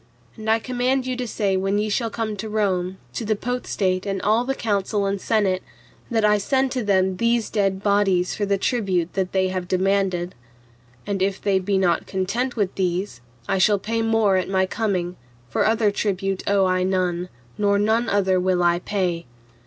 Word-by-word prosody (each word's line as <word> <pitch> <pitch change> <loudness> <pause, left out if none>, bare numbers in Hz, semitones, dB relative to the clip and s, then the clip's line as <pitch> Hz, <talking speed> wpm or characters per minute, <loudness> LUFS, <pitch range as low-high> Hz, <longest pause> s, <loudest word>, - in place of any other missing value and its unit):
And 220 -1 -5
I 220 - +5
command 255 +2 -1
you 255 -1 -2
to 250 -1 -3
say 200 -3 0
when 195 +2 0
ye 210 +1 0
shall 225 +2 0
come 220 -1 -3
to 220 +2 -5
Rome, 190 -3 0 0.2
to - - -3
the 215 0 +1
Potestate 200 -5 -2
and 195 -1 -1
all 220 +3 +3
the 270 +1 -1
Council 205 -2 0
and 195 0 -1
Senate, 195 -4 +1 0.5
that 225 -3 +2
I 210 0 +4
send 265 +5 +1
to 255 -2 -2
them 190 -2 +2
these 235 0 +1
dead 195 -2 0
bodies 195 -3 +2
for 210 - -3
the 200 -1 +1
tribute 190 -6 0
that 190 -1 -1
they 190 -1 +1
have 185 -1 -3
demanded. 185 -1 0 0.7
And 200 -2 -2
if 195 0 0
they 195 -2 +1
be 195 +1 0
not 180 -3 +1
content 225 +7 -2
with 205 -5 0
these, 180 - -2 0.3
I 195 - +1
shall 205 +2 +4
pay 225 +3 -2
more 225 -3 +3
at 185 - -1
my 190 -1 +2
coming, 185 -4 -2 0.3
for - - +2
other 220 -1 +2
tribute 195 -2 -1
owe 200 -1 +3
I 185 0 +1
none, 180 -1 0 0.3
nor 200 -1 +3
none 220 +3 +1
other 190 -2 +2
will 180 -1 +1
I 175 0 +3
pay. 180 -5 -2
200 Hz, 190 wpm, -23 LUFS, 185-220 Hz, 0.7 s, I